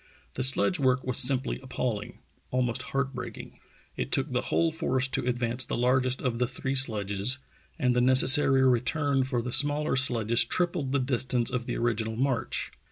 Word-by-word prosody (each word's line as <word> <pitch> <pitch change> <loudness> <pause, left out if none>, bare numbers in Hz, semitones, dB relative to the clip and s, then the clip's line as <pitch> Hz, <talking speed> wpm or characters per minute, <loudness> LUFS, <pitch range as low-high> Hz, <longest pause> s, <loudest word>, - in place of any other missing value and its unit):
The - - -4
sledge 140 +7 +1
work 130 -1 +1
was 130 -2 +1
simply 130 +1 +3
appalling, 125 -5 -5 0.3
almost 125 -1 -1
heart 135 0 -3
breaking. 125 - -9 0.4
It - - -5
took - - 0
the - - -1
whole 165 -1 0
force 130 -4 -1
to 125 - -3
advance 120 0 +1
the - - -4
largest 130 +1 0
of 120 -3 -2
the 125 - 0
three 130 +1 -5
sledges, 110 -2 +2 0.4
and 125 -1 0
the 125 - +2
necessary 130 +1 +5
re 125 -2 +3
turn 140 0 0
for 125 -3 -3
the 125 - -5
smaller 145 +3 +1
sledges 120 -3 +2
tripled 170 +1 -2
the 140 - +1
distance 125 -2 -1
of 125 0 -4
the 120 - -3
original 110 -1 -2
march. 130 0 -2
130 Hz, 175 wpm, -27 LUFS, 120-135 Hz, 0.4 s, necessary